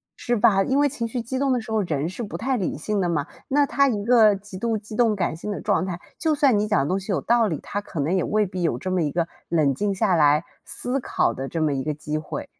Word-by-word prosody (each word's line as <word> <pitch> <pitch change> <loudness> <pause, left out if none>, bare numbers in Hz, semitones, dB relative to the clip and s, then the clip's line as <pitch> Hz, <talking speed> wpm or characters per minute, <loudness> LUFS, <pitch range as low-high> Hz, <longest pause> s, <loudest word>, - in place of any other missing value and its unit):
是 240 0 -1
吧， 210 -3 +4
因 265 +7 0
为 290 0 +4
情 240 -4 -3
绪 245 +2 -4
激 260 +3 -3
动 275 -1 +1
的 250 - +2
时 220 0 -8
候， 220 -1 +2
人 155 -4 -1
是 190 - -7
不 205 - -5
太 260 +3 -1
理 185 - -2
性 200 +6 -1
的 175 - 0
嘛， 150 -4 0 0.2
那 285 +1 +3
她 280 0 +2
一 210 -5 -1
个 220 -4 +6
极 195 -1 -9
度 230 -1 0
激 215 +1 -9
动 225 -3 +3
感 175 -4 -1
性 205 +6 -5
的 - - -4
状 - - +1
态， 175 -1 -4 0.2
就 315 -2 +1
算 270 -8 +3
你 210 - 0
讲 210 - +2
的 135 - 0
东 185 +3 0
西 195 +2 -5
有 190 - 0
道 235 -1 +3
理， 160 -7 -2
她 205 - -3
可 170 - -7
能 155 +7 +1
也 185 - +1
未 210 -1 +1
必 185 -1 -5
有 165 - 0
这 185 0 -4
么 185 -2 +1
一 150 - 0
个 170 +1 0 0.2
冷 150 -5 +2
静 200 +6 -1
下 190 0 +2
来 150 0 +4 0.2
思 255 +2 -2
考 - - 0
的 135 +1 -5
这 165 - -3
么 155 -2 +1
一 135 - -2
个 150 0 -2
机 150 +1 -3
会。 155 - -6
200 Hz, 315 characters per minute, -24 LUFS, 165-235 Hz, 0.2 s, 个